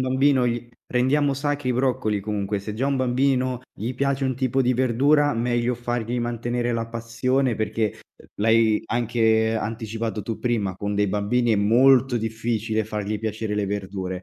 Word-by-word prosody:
bambino 130 +1 +3
gli 120 0 -2 0.2
rendiamo 135 +3 +2
sacri 145 -1 -2
i - - +2
broccoli 125 -4 0
comunque, 100 0 -2
se 105 +2 -6
già 130 +5 -1
a - - +1
un 140 - +1
bambino 130 0 +1
gli 115 +5 -4
piace 135 +1 0
un 130 - 0
tipo 130 +1 0
di 125 0 +2
verdura, 140 +4 +3
meglio 120 +1 0
fargli 120 0 -2
mantenere 120 0 -2
la 115 -1 -2
passione 120 +3 0
perché, 110 -1 -2 0.2
uhm, - - -18
l'hai 110 0 +3
anche 110 -1 +1
anticipato 110 0 -3
tu 110 +2 -4
prima, 110 -6 -1
con 100 +1 -3
dei 105 0 +2
bambini 110 +4 +1
è 105 - +3
molto 125 +4 +4
difficile 110 -1 -1
fargli 105 0 -3
piacere 110 -1 -3
le 105 -1 -1
verdure. 95 -2 -4
115 Hz, 170 wpm, -24 LUFS, 110-130 Hz, 0.2 s, molto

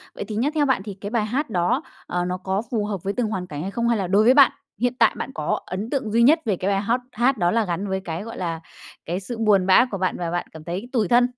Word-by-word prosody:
Vậy - - -4
thì 215 - -5
nhá, 255 +7 +1
theo 295 -2 +3
bạn 265 -7 +2
thì 205 -2 -6
cái 205 - -4
bài 225 -2 0
hát 260 +5 -2
đó, 175 -3 +1 0.3
ờ, 175 0 -1
nó 180 0 -2
có 190 +2 -2
phù 215 -3 0
hợp 200 -5 -4
với 200 +1 -1
từng 245 -3 0
hoàn 185 -4 -3
cảnh 145 -2 -6
hay 195 +3 -4
không? 235 +2 -1
Hay 230 - +2
là 190 -3 -2
đối 200 +4 +4
với 250 +3 +6
bạn, 280 -1 +7 0.3
hiện 245 0 +1
tại - - +5
bạn 265 - -4
có 150 - -1
ấn 200 +5 -4
tượng 255 -7 -2
duy 235 +1 +4
nhất 310 +6 +6
về 205 -4 +1
cái 190 +3 -1
bài 195 0 +1
hát 235 +4 0
hát 245 +3 +2
đó 175 -1 +2
là 225 -2 +2
gắn 180 +3 -2
với 190 0 -1
cái, 170 +3 -4
gọi 230 - -8
là, 165 -3 -3 0.5
cái 175 +3 -2
sự 225 +4 -6
buồn 205 -4 +3
bã 215 +7 +6
của 195 - -2
bạn 185 0 -1
và 170 -1 -3
bạn 175 - -2
cảm 160 -1 -11
thấy 185 +8 -5
tủi 220 -6 +2
thân? 245 +1 +4
205 Hz, 305 wpm, -23 LUFS, 185-235 Hz, 0.5 s, bạn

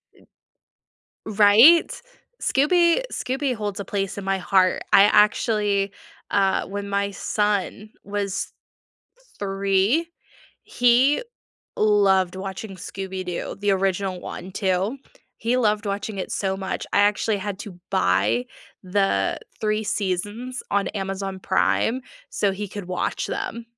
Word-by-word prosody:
Eh, - - -22
b - - -26 1.0
Right? 220 +10 +6 0.4
Scooby 340 - +3
Scooby 260 0 -2
holds 205 -2 -4
a 200 - -4
place 195 -1 -3
in 200 - -5
my 195 0 +1
heart. 185 0 +2
I 195 - +8
actually 210 -1 +3 0.4
uh, 195 -1 +2
when 200 0 -5
my 200 0 0
son 210 +1 -1
was 200 -1 -3 0.9
3, 195 - +1 0.6
he 250 - +3 0.6
loved 195 -3 +3
watching 195 +1 -6
Scooby 190 +1 -6
Doo, 180 -1 -4
the 205 0 0
original 190 -1 -1
one 185 +1 -8
too. 190 +6 -1 0.4
He 235 +3 0
loved 215 -3 +1
watching 200 +1 -3
it 185 - -4
so 190 -1 -1
much, 190 0 -4
I - - +3
actually 205 +1 +2
had 195 0 -5
to 185 -4 -9
buy 100 +7 +2 0.4
the 185 - 0 0.2
3 215 0 0
seasons 205 +6 -3
on 200 0 +1
Amazon 195 -1 -4
Prime 225 +6 +1 0.3
so 200 - +1
he 205 +1 -5
could 200 -1 -7
watch 185 - -2
them. 385 -13 -4
200 Hz, 125 wpm, -23 LUFS, 190-215 Hz, 1.0 s, I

